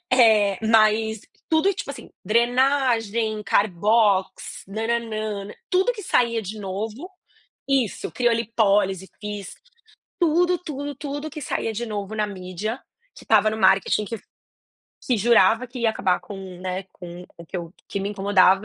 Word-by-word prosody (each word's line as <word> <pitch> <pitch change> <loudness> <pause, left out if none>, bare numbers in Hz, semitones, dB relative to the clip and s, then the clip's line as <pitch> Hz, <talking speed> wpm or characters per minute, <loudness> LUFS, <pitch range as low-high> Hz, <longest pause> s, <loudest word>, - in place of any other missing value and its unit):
eh, 215 -6 +5
mas 220 0 +3 0.3
tudo 315 +3 +3
e, 395 - +2
tipo 355 - -5
assim, 280 - -10
drenagem, 235 -1 +2
Carbox, 205 0 +1
nã-nã-nã, 215 -1 -2
nã 205 - -10
tudo 380 +7 +2
que 430 -3 -8
saía 235 - +2
de 215 +1 -7
novo 215 - -5 0.6
Isso, 265 -6 0
criolipólise, 210 -5 +1
fiz. 205 -2 -6 0.6
Tudo, 350 +1 +3
tudo, 290 -3 -6
tudo 290 +2 -5
que 305 +1 -7
saía 225 -4 -2
de 235 +3 -3
novo 210 -2 -5
na 210 -1 0
mídia, 195 +4 -5 0.4
que - - -14
tava 215 -1 +4
no 220 - -4
marketing 195 +1 +3
que 225 +1 -5 0.9
que 245 -3 +2
jurava 225 +2 +4
que 250 0 -8
ia 230 -1 +3
acabar 185 -4 +1
com 205 - -10 0.2
o, - - -14
né, 185 +1 -3
com 175 0 -10
o 170 - -11
que - - -24
eu 170 +1 -8
que 200 - -4
me 195 - -2
incomodava, 195 -1 +3
220 Hz, 150 wpm, -23 LUFS, 200-245 Hz, 0.9 s, eh